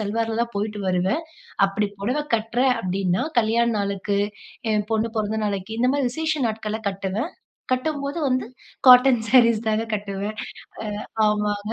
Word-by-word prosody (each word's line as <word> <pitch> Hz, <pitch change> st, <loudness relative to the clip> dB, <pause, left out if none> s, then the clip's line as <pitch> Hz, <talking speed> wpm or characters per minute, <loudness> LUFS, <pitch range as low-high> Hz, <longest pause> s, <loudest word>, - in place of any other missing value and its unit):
சல்வார்ல 225 Hz, +2 st, -1 dB
தான் 235 Hz, -, -4 dB
போயிட்டு 210 Hz, 0 st, -2 dB
வருவேன். 185 Hz, -, +1 dB, 0.4 s
அப்படி 200 Hz, +1 st, -1 dB
பொடவை 250 Hz, +9 st, 0 dB
கட்டுறேன் 240 Hz, +4 st, +2 dB
அப்படீன்னா, 185 Hz, 0 st, 0 dB, 0.2 s
கல்யாண 230 Hz, +2 st, +2 dB
நாளுக்கு, 200 Hz, 0 st, -1 dB, 0.5 s
என் 210 Hz, -1 st, 0 dB
பொண்ணு 220 Hz, +1 st, +1 dB
பொறந்த 215 Hz, 0 st, -1 dB
நாளைக்கு 205 Hz, +1 st, -3 dB
இந்த 250 Hz, +2 st, +3 dB
மாரி 280 Hz, -3 st, +1 dB
விசேஷ 315 Hz, +1 st, -1 dB
நாட்கள்ல 220 Hz, 0 st, -4 dB
கட்டுவேன். 195 Hz, -, -3 dB, 0.4 s
கட்டும்போது 280 Hz, +3 st, -1 dB
வந்து 255 Hz, 0 st, +1 dB, 0.4 s
காட்டன் 250 Hz, -1 st, +8 dB
சாரீஸ் 235 Hz, -3 st, +5 dB
தாங்க 215 Hz, 0 st, +1 dB
கட்டுவேன். 205 Hz, +1 st, -5 dB, 0.7 s
அ 220 Hz, -, -3 dB
ஆமாங்க. 210 Hz, 0 st, -1 dB
220 Hz, 140 wpm, -23 LUFS, 205-245 Hz, 0.7 s, காட்டன்